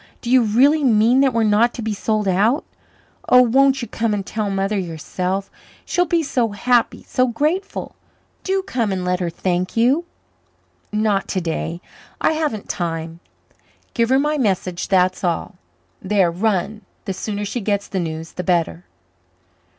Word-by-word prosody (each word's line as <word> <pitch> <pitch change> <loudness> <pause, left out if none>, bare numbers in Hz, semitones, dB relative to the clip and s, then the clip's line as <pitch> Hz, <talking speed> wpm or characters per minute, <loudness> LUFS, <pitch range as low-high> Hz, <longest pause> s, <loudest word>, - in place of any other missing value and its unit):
Do 240 - -4
you 255 0 +6
really 265 +8 +3
mean 235 +1 +4
that 270 -1 +4
we're 230 -1 +1
not 220 +3 +3
to 235 - -5
be 220 -1 -1
sold 215 0 -1
out? 210 - +2 0.6
Oh, 250 0 +7
won't 265 +2 +3
you - - -4
come 225 -2 -1
and 200 -2 -4
tell 215 -1 -2
Mother 195 +1 -1
yourself? 180 +3 -3 0.3
She'll 355 0 +1
be 335 +1 +1
so 240 -7 0
happy 240 +3 +1
so 255 0 +1
grateful. 310 - -2 0.5
Do 385 0 0
come 235 - -1
and 185 -1 -2
let 180 0 0
her 175 -2 -1
thank 180 +3 -2
you." 265 +9 +3 0.9
"Not 210 -2 0
today. 170 -1 -3 0.4
I - - +2
haven't 305 -10 -2
time. 165 -1 -4 0.7
Give 230 -1 +1
her 260 - +4
my 300 +2 +1
message, 185 -6 -1
that's 185 -1 +2
all. 180 +2 -2 0.4
There, 190 -3 +2
run; 205 +2 -1 0.2
the 195 - -2
sooner 205 +2 -4
she 235 +4 -3
gets 200 0 -1
the 190 - -3
news 160 -1 -4
the 180 - -5
better." 165 - 0
210 Hz, 160 wpm, -20 LUFS, 185-250 Hz, 0.9 s, Oh